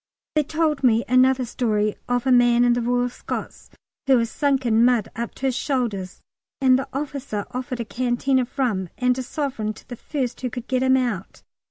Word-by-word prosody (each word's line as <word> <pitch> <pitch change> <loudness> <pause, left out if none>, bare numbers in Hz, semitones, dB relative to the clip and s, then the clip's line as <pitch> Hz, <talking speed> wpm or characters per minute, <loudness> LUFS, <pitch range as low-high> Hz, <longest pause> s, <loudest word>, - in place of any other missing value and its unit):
They 305 - +3
told 305 -1 -1
me 235 -2 +4
another 255 +1 +4
story 215 -3 0
of 245 0 0
a 260 - +3
man 240 -1 +5
in 240 - +4
the 240 - 0
Royal 245 +1 +1
Scots 245 - -7 0.4
who 265 -1 +6
was 230 -1 0
sunk 275 -3 +1
in 225 0 +4
mud 240 -3 +3
up 235 0 -4
to 270 - -5
his 260 -2 +1
shoulders, 235 -10 -2 0.4
and 260 -1 +4
the 270 - -4
officer 275 -6 -4
offered 250 -1 -4
a - - -4
canteen 255 +3 0
of 250 +2 -4
rum 205 -9 0
and 250 0 +2
a - - 0
sovereign 255 -5 -3
to - - -17
the 245 - -7
first 255 -1 -4
man 255 - -1
who - - -4
could 245 0 -7
get 255 -1 0
him 260 0 +4
out. 235 -7 -3
250 Hz, 210 wpm, -23 LUFS, 235-265 Hz, 0.4 s, who